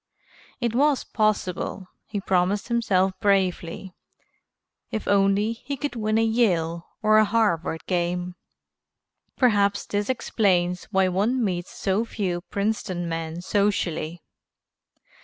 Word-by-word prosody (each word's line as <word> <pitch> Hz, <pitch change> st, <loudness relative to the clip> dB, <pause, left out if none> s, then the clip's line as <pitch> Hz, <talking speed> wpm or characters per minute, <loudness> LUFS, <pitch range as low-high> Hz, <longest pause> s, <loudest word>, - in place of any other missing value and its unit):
It 235 Hz, -3 st, -1 dB
was 280 Hz, +2 st, +3 dB
possible, 200 Hz, -3 st, -1 dB, 0.2 s
he 205 Hz, -, -3 dB
promised 190 Hz, +3 st, 0 dB
himself 195 Hz, -5 st, +2 dB
bravely, 190 Hz, -2 st, 0 dB, 1.0 s
if 220 Hz, -, -4 dB
only 200 Hz, +2 st, +3 dB
he 280 Hz, +4 st, -6 dB
could 275 Hz, 0 st, -3 dB
win 215 Hz, -1 st, 0 dB
a 225 Hz, -, +3 dB
Yale 175 Hz, -8 st, +1 dB, 0.2 s
or 215 Hz, 0 st, +6 dB
a -, -, +6 dB
Harvard 190 Hz, -7 st, 0 dB
game." 180 Hz, 0 st, -1 dB, 1.0 s
Perhaps 205 Hz, -5 st, +3 dB
this 205 Hz, +2 st, -2 dB
explains 180 Hz, -7 st, +1 dB
why 190 Hz, -2 st, +2 dB
one 215 Hz, +8 st, +1 dB
meets 175 Hz, -2 st, -2 dB
so 195 Hz, +3 st, -1 dB
few 185 Hz, -6 st, -3 dB
Princeton 200 Hz, -4 st, -2 dB
men 165 Hz, 0 st, -4 dB
socially. 180 Hz, -5 st, -1 dB
200 Hz, 115 wpm, -25 LUFS, 180-220 Hz, 1.0 s, or